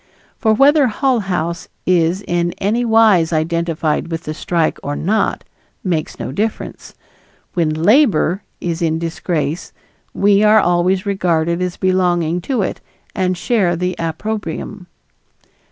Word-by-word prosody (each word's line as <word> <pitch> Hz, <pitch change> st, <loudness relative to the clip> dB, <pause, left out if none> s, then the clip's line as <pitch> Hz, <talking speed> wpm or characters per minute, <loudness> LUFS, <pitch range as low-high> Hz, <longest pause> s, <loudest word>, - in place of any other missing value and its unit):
For 220 Hz, -, +2 dB
whether 280 Hz, +3 st, +5 dB
Hull 250 Hz, +2 st, +1 dB
House 175 Hz, -4 st, -3 dB, 0.2 s
is 180 Hz, +1 st, +2 dB
in 175 Hz, -1 st, -1 dB
any 215 Hz, +5 st, 0 dB
wise 220 Hz, -8 st, +4 dB
identified 165 Hz, 0 st, -1 dB
with 165 Hz, 0 st, -4 dB
the 155 Hz, -, -4 dB
strike 165 Hz, 0 st, -1 dB
or 145 Hz, +1 st, -3 dB
not, 215 Hz, +9 st, 0 dB, 0.4 s
makes 170 Hz, -5 st, -2 dB
no -, -, -5 dB
difference. 215 Hz, +9 st, -4 dB, 0.6 s
When 170 Hz, -3 st, +1 dB
"Labor" 190 Hz, -, +3 dB, 0.2 s
is 170 Hz, 0 st, -3 dB
in 160 Hz, -1 st, +1 dB
disgrace 165 Hz, -1 st, -3 dB, 0.4 s
we 200 Hz, 0 st, +3 dB
are 215 Hz, +1 st, +6 dB
always 180 Hz, +1 st, +1 dB
regarded 170 Hz, -3 st, 0 dB
as 180 Hz, -1 st, -2 dB
belonging 180 Hz, -2 st, +1 dB
to 250 Hz, -7 st, +1 dB
it -, -, -4 dB, 0.3 s
and 185 Hz, -3 st, 0 dB
share 185 Hz, -3 st, +1 dB
the 180 Hz, +1 st, -2 dB
opprobrium. 180 Hz, +2 st, -4 dB
180 Hz, 130 wpm, -18 LUFS, 165-205 Hz, 0.6 s, are